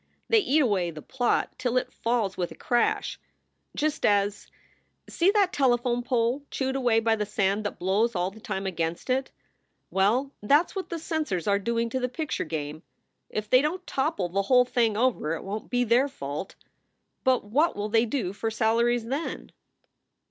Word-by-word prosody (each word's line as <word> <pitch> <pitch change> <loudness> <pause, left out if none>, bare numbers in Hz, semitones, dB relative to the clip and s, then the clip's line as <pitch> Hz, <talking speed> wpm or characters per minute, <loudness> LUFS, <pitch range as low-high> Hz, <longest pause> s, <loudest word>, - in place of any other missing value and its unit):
They 455 - +6
eat 310 -5 +3
away 195 -8 +1
the 155 -2 -9
plot 245 -2 0
till 250 0 0
it - - -1
falls 230 -5 0
with 175 -1 -2
a - - -11
crash 240 -1 0 0.6
just 305 0 -1
as 205 0 +2 0.6
see 350 +3 +2
that 400 -3 +3
telephone 245 -2 +2
pole 245 +2 0
chewed 265 -1 -2
away 245 -4 +3
by 225 0 +2
the 210 - -1
sand 200 +1 0
that 205 - -3
blows 205 +5 +1
all 180 +1 0
the 220 - -14
time 195 -2 -4
against 170 +4 -2
it? 265 +1 0 0.6
Well, 230 +9 +2
that 290 +11 +4
s - - -17
what 385 - -4
the 335 - -3
censors 310 - -2
are 200 -1 +2
doing 235 +2 0
to 260 - -1
the 250 0 -1
picture 305 - -3
game. 155 -1 -4 0.5
If 215 0 -3
they 255 +4 +5
don 305 +5 0
t 370 - -31
topple 265 - -1
the 195 +3 0
whole 250 +4 +4
thing 230 -4 +1
over 225 -10 +1
it - - -7
won 205 +2 -4
t - - -22
be 245 0 +1
their 245 +4 +3
fault. 150 - -6 0.7
But 260 -2 +3
what 280 +11 +1
will 205 +1 -3
they 225 +2 +3
do 215 -7 -2
for 225 +2 -2
salaries, 230 +1 +1
then? 275 +7 -4
235 Hz, 190 wpm, -27 LUFS, 200-265 Hz, 0.7 s, They